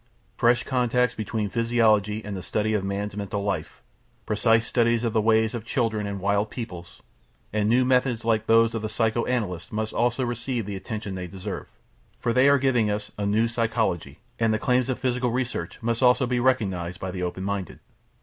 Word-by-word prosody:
Fresh 120 0 +3
contacts 125 -1 +1
between 110 0 -2
physiology 110 -2 +2
and 105 -1 -4
the 95 - -5
study 110 +3 -1
of 105 -3 0
man's 100 +1 -3
mental 100 0 -3
life; 95 -6 -3 0.4
precise 115 +2 +2
studies 120 -1 +2
of 115 -2 0
the 110 - +3
ways 110 +1 +3
of 120 -3 -4
children 115 -4 -1
and 100 -1 -4
wild 100 +2 +1
peoples; 90 -8 -8 0.5
and 105 0 +1
new 125 +2 +4
methods 125 -3 +1
like 110 -1 +1
those 115 0 +5
of 115 - -2
the 110 - -3
psycho 115 +1 0
analyst 95 -9 -2
must 110 0 -3
also 120 +2 +1
receive 120 -1 -3
the 100 0 -5
attention 105 0 -5
they 90 -1 -5
deserve, 95 +2 -6 0.5
for 115 - 0
they 130 +3 +5
are 140 - +6
giving 125 -5 +2
us 105 0 -3
a 100 - 0
"New 110 +3 +2
Psychology" 115 -6 -1 0.2
and 115 -1 +3
the 110 - +2
claims 125 +2 +1
of 130 - -1
psychical 125 -1 0
research 125 +1 -3
must 115 +1 0
also 125 +1 +5
be 125 0 0
recognised 95 -9 0
by 95 - -4
the 90 -1 -5
open 90 +1 -3
minded. 100 -3 -3
110 Hz, 195 wpm, -25 LUFS, 100-120 Hz, 0.5 s, are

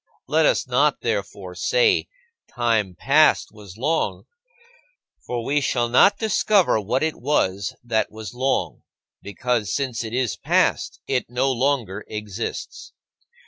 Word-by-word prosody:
Let - - +3
us - - +1
not, - - +2
therefore, - - -3
say, 465 -5 +2 0.5
"Time 115 -6 0
past 150 - +3
was 105 -3 -13
long," 155 +7 -1 1.0
for 120 -1 -3
we 145 +1 +1
shall 120 -3 0
not 200 +12 +5
discover 210 - +2
what 110 +8 -1
it 160 -1 -1
was 100 -8 0
that 115 -2 0
was 110 -1 -8
long 120 - -1 0.4
because, 105 +1 -2
since 130 -5 -2
it 110 +1 -5
is 125 -4 -1
past, - - +1
it 130 -4 -1
no 130 +2 +1
longer 120 -6 -1
exists. 105 +1 -6
120 Hz, 130 wpm, -22 LUFS, 110-140 Hz, 1.0 s, not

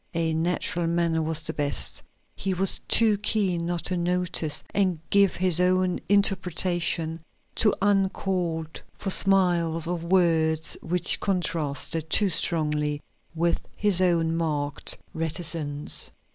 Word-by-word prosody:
A 165 -1 0
natural 170 +1 -1
manner 170 -1 0
was 160 0 -1
best; 145 -1 -2 0.3
he 190 -1 -3
was 190 +1 -1
too 220 -3 +4
keen 190 -5 0
not 175 -1 -3
to 185 - -1
notice 175 -3 0
and 185 -5 0
give 200 -1 +3
his 180 -1 +1
own 185 0 +1
interpretation 180 -4 +1 0.4
to 210 - +3
uncalled 185 -5 -1
for 195 - -3
smiles 175 -5 +5
or 175 +1 -2
words 165 -2 +1
which 175 +1 0
contrasted 165 -4 -2
too 200 +3 +3
strongly 150 -2 0 0.4
with 170 +1 0
his 205 -4 0
own 165 -3 +1
marked 150 -3 -2 0.2
reticence. 160 -3 -1
170 Hz, 115 wpm, -25 LUFS, 160-185 Hz, 0.4 s, smiles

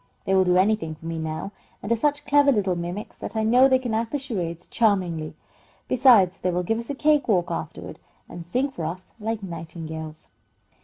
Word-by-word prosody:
They 190 - +1
will 190 -1 +5
do 180 0 +3
anything 190 -5 +1
for 155 - -16
me 165 0 -3
now, 160 +4 -4 0.3
and 205 - -4
are - - +5
such 290 +5 0
clever 290 -1 +5
little 200 -7 +1
mimics 175 +5 -6
that - - -6
I 220 - +1
know 250 +4 +6
they 260 -1 +4
can 250 -3 -4
act 225 +1 -1
the 290 - 0
charades 180 - -4
charmingly. 180 -8 0 0.5
Besides, 225 -8 +5
they 180 - 0
will 180 0 0
give 225 +5 -1
us 235 - -7
a 285 - -2
cake 300 0 +2
walk 180 -6 +1
afterward, 160 -2 -6 0.3
and 175 - -8
sing 255 +11 -1
for 170 - -6
us 175 +4 -6
like 220 0 -3
nightingales." 160 -2 -7
195 Hz, 205 wpm, -24 LUFS, 170-235 Hz, 0.5 s, know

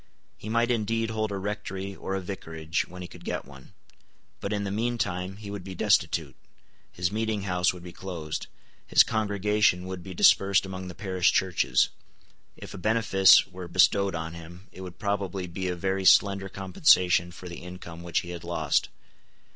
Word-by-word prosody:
He 105 - -9
might 115 +2 +2
indeed 115 0 0
hold 110 -1 -2
a 100 - -2
rectory 100 -1 -5
or 95 - -4
a 95 - -2
vicarage, 80 -3 -4
when 90 +1 -9
he - - -6
could - - -14
get - - -4
one. 70 0 -15 0.7
But 100 - -4
in 105 -1 -1
the 100 - -3
meantime 100 -4 -2
he 105 -1 -8
would 100 -2 -6
be 95 0 -8
destitute: - - +1 0.6
his 90 +1 -2
meeting 110 -1 -1
house 90 -1 +1
would 90 -1 -11
be 90 - -8
closed: 85 -5 -6 0.4
his - - +7
congregation 105 -3 +1
would 95 -1 -6
be 95 +1 -9
dispersed 95 +2 +5
among 95 -1 -6
the 90 - -8
parish 95 -3 +1
churches: 90 -9 +2 0.7
if - - -10
a - - -8
benefice 105 -2 +5
were 90 -1 -9
bestowed 95 +2 +3
on 80 0 -4
him, 85 +3 -12
it 95 - -11
would 90 -2 -9
probably 100 -2 -2
be 90 +2 -4
a 90 - -1
very 95 +2 -1
slender 100 0 +4
compensation 90 - +3
for 90 +1 -10
the 85 - -8
income 90 -2 -9
which 85 -1 -1
he 85 - -8
had 85 -1 -7
lost. 80 -4 0
95 Hz, 180 wpm, -27 LUFS, 90-100 Hz, 0.7 s, his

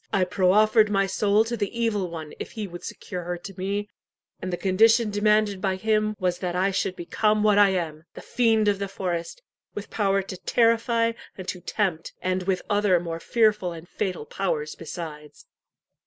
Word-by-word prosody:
I 195 - +2
proffered 210 +4 +4
my 195 -1 +2
soul 205 +2 +2
to 235 +1 -2
the 205 -3 -2
Evil 210 -6 0
One 160 -2 -7
if - - -7
he 220 -2 -4
would 175 -2 -9
secure 180 -4 -6
her 175 +1 -4
to 195 +3 -9
me, 200 +2 -2 0.5
and 185 - -4
the 175 - -2
condition 220 +4 +4
demanded 205 -1 +2
by 190 -1 0
him 215 +1 +1
was 180 -2 0
that 180 -2 -3
I 190 +2 +2
should 190 -1 -1
become 210 +5 +1
what 210 -1 +4
I 205 -1 +7
am 165 -4 -3
the - - -8
fiend 225 -3 +2
of 200 -1 +2
the 200 - -2
forest, 185 - -4 0.3
with 205 0 -7
power 195 -2 +1
to 185 -1 -7
terrify 230 +1 +2 0.3
and 185 -1 -8
to 180 - -4
tempt, 185 -6 -2
and 185 0 -1
with 185 -2 0
other 205 -4 +3
more 165 -1 -5
fearful 210 -4 +2
and 165 +1 -10
fatal 180 -5 -3
powers 155 -6 -2
besides." 155 -3 -8
195 Hz, 185 wpm, -25 LUFS, 180-215 Hz, 0.5 s, I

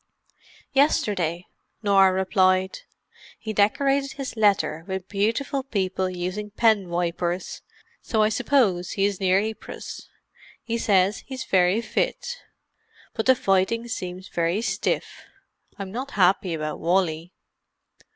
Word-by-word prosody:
"Yesterday," 185 - +1 0.4
Norah 195 -2 +5
replied. 185 0 +2 0.6
"He 220 - -5
decorated 275 +7 +2
his 275 -3 -6
letter 205 -7 +2
with 190 -1 -4
beautiful 230 +7 -1
people 190 -7 -1
using 185 +4 -4
pen 210 -3 +2
wipers, 175 +1 -2 0.4
so 220 -2 +1
I 215 - +3
suppose 215 -7 +1
he 195 - +1
is 200 -2 -1
near 190 -1 +3
Ypres. 220 +1 -6 0.5
He 230 0 -2
says 195 -2 +2
he's 260 -1 -5
very 185 +3 +3
fit. 480 - -2 0.8
But 220 - -2
the 260 - +7
fighting 230 0 +1
seems 185 -4 -5
very 170 +6 -1
stiff. - - -2 0.6
I'm 195 -2 -6
not 255 +6 -4
happy 185 -2 +3
about 155 -1 -4
Wally." 170 -1 0
195 Hz, 120 wpm, -24 LUFS, 185-225 Hz, 0.8 s, the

